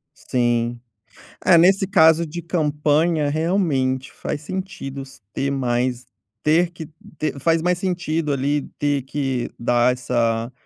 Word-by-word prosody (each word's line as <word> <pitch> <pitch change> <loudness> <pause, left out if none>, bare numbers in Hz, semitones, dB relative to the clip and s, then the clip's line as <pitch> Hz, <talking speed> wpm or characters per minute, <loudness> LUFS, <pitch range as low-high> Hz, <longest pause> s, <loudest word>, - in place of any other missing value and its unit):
Sim. 120 -1 -1 0.7
É, 175 - +7
nesse 190 +3 +4
caso 165 -3 +5
de 170 +2 -6
campanha, 155 -1 +1
realmente, 145 -5 0
faz 145 - -5
sentido 185 -6 -6
se 135 0 -16
ter 140 0 -1
mais, 125 -1 -1 0.4
ter 165 +3 +3
que 165 -3 -9 0.3
ter 150 -2 -2
faz 165 +3 +2
mais 180 +1 +1
sentido 170 -4 -1
ali, 140 +1 0 0.2
ter 145 -2 0
que 135 -2 -2
dar 120 +1 +3
essa 120 -2 -1
145 Hz, 130 wpm, -21 LUFS, 130-165 Hz, 0.7 s, É